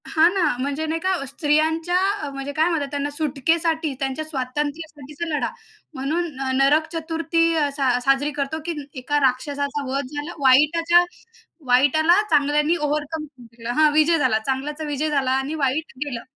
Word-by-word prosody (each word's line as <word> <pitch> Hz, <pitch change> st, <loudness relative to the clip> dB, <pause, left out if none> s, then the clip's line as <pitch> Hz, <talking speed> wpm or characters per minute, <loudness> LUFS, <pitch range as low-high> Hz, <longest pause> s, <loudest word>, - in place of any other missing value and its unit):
हां 325 Hz, +2 st, +4 dB
ना. 385 Hz, -3 st, +1 dB, 0.2 s
म्हणजे 285 Hz, +4 st, -2 dB
नाही 320 Hz, +1 st, -2 dB
का 375 Hz, +3 st, 0 dB
अ, -, -, -4 dB
स्त्रियांच्या 315 Hz, +4 st, +1 dB, 0.2 s
अ, 290 Hz, -, -4 dB
म्हणजे 275 Hz, +1 st, -5 dB
काय 315 Hz, +4 st, +2 dB
म्हणतात 310 Hz, -5 st, -1 dB
त्यांना 285 Hz, 0 st, -2 dB
सुटकेसाठी, 315 Hz, +1 st, 0 dB
त्यांच्या 270 Hz, +3 st, -3 dB
स्वातंत्र्यासाठीचा 295 Hz, +2 st, -4 dB
लढा, -, -, -1 dB, 0.4 s
म्हणून 310 Hz, +6 st, -2 dB
न 265 Hz, 0 st, -3 dB
नरक 295 Hz, +4 st, +3 dB
चतुर्थी 330 Hz, 0 st, -1 dB, 0.3 s
सा 260 Hz, -4 st, +1 dB
साजरी 275 Hz, +2 st, +2 dB
करतो, 285 Hz, +3 st, -2 dB
की 345 Hz, -, -2 dB, 0.3 s
एका 290 Hz, +3 st, 0 dB
राक्षसाचा 280 Hz, +2 st, -1 dB
वध 275 Hz, 0 st, -1 dB
झाला. 295 Hz, +3 st, -4 dB
वाईटाच्या 330 Hz, +6 st, +5 dB, 0.6 s
वाईटाला 290 Hz, +9 st, +4 dB
चांगल्यानी 295 Hz, +2 st, +2 dB
ओव्हरकम 300 Hz, +1 st, -2 dB
जिंकला 240 Hz, -4 st, -9 dB
हां, 305 Hz, -1 st, +6 dB
विजय 310 Hz, +2 st, +4 dB
झाला, 255 Hz, -7 st, +2 dB
चांगल्याचा 290 Hz, +4 st, -3 dB
विजय 295 Hz, +1 st, -2 dB
झाला 275 Hz, -3 st, +1 dB
आणि 270 Hz, +3 st, -1 dB
वाईट 290 Hz, +2 st, -1 dB
गेलं. 240 Hz, -5 st, -5 dB
295 Hz, 155 wpm, -22 LUFS, 275-320 Hz, 0.6 s, हां